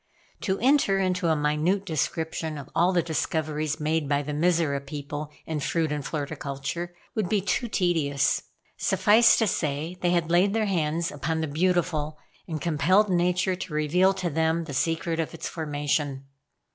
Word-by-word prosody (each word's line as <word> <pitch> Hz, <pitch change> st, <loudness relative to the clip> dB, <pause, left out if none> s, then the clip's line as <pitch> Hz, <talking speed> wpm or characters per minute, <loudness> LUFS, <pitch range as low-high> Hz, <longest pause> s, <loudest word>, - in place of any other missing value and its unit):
To 190 Hz, -2 st, -1 dB
enter 255 Hz, -5 st, +3 dB
into 185 Hz, -2 st, 0 dB
a 160 Hz, -, +3 dB
minute 150 Hz, +6 st, +1 dB
description 160 Hz, -1 st, -2 dB
of 140 Hz, -2 st, -9 dB
all 175 Hz, +2 st, +3 dB
the 175 Hz, -2 st, +2 dB
discoveries 155 Hz, -2 st, -2 dB
made 155 Hz, -1 st, 0 dB
by 145 Hz, 0 st, +1 dB
the 150 Hz, -, -4 dB
Mizora 155 Hz, -3 st, +1 dB
people 145 Hz, +1 st, -6 dB, 0.2 s
in 160 Hz, -2 st, -3 dB
fruit 160 Hz, +2 st, 0 dB
and 150 Hz, -1 st, -2 dB
floriculture, 145 Hz, +2 st, -4 dB, 0.2 s
would 210 Hz, -5 st, -1 dB
be 210 Hz, -, +2 dB
too 205 Hz, +5 st, -1 dB
tedious; 160 Hz, -9 st, +1 dB, 0.4 s
suffice 205 Hz, +5 st, +5 dB
to 225 Hz, -, +3 dB
say 155 Hz, -1 st, -2 dB
they 175 Hz, -, +2 dB
had 170 Hz, -2 st, +1 dB
laid 190 Hz, +4 st, +3 dB
their 220 Hz, -1 st, +2 dB
hands 165 Hz, -3 st, 0 dB
upon 155 Hz, +3 st, -2 dB
the 160 Hz, -, -1 dB
beautiful 155 Hz, -1 st, 0 dB, 0.3 s
and 160 Hz, -2 st, -3 dB
compelled 175 Hz, +7 st, +2 dB
nature 180 Hz, +1 st, +2 dB
to 180 Hz, -3 st, -7 dB
reveal 175 Hz, +5 st, +3 dB
to 185 Hz, -3 st, -2 dB
them 160 Hz, +2 st, +1 dB
the 145 Hz, -, -7 dB
secret 165 Hz, +3 st, 0 dB
of 165 Hz, +1 st, -2 dB
its 165 Hz, -, -5 dB
formation. 145 Hz, -3 st, -2 dB
160 Hz, 165 wpm, -26 LUFS, 150-180 Hz, 0.4 s, suffice